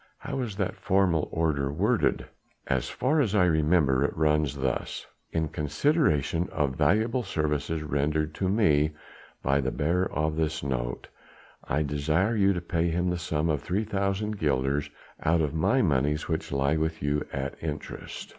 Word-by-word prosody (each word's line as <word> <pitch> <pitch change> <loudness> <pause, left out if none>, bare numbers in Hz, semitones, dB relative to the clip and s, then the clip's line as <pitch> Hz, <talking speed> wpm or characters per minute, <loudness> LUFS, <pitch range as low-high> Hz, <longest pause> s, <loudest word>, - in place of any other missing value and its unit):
"How - - -5
is 115 -6 -3
that 95 -2 -2
formal 90 -5 +2
order 75 -4 0
worded?" 105 +10 +1 0.4
"As - - -1
far 145 +5 +1
as 110 -6 0
I 90 -3 +5
remember 75 -4 +3
it 70 - -1
runs 75 -2 +2
thus: 65 -2 -2 0.3
'In 80 -1 0
consideration 80 - +1
of 70 -4 0
valuable 110 - +2
services 75 -5 -1
rendered 75 +1 0
to 95 +4 -1
me 75 -8 +3 0.5
by 70 +1 +2
the 65 - 0
bearer 85 +8 0
of 75 +1 -1
this 80 0 -1
note, 60 -3 -3 0.6
I 75 +4 0
desire 75 +9 +1
you 100 -2 +4
to 90 - -3
pay 85 0 0
him 90 +2 0
the 90 - -2
sum 80 -2 -1
of 75 -3 0
3,000 100 +1 -1
guilders 70 0 0 0.3
out 85 +2 +2
of 75 -2 -1
my 120 +11 +2
monies 75 -1 +1
which - - -2
lie 70 +2 +1
with 80 0 -2
you 75 +1 +1
at 70 0 -3
interest.' 75 -2 -6
80 Hz, 160 wpm, -27 LUFS, 75-95 Hz, 0.6 s, I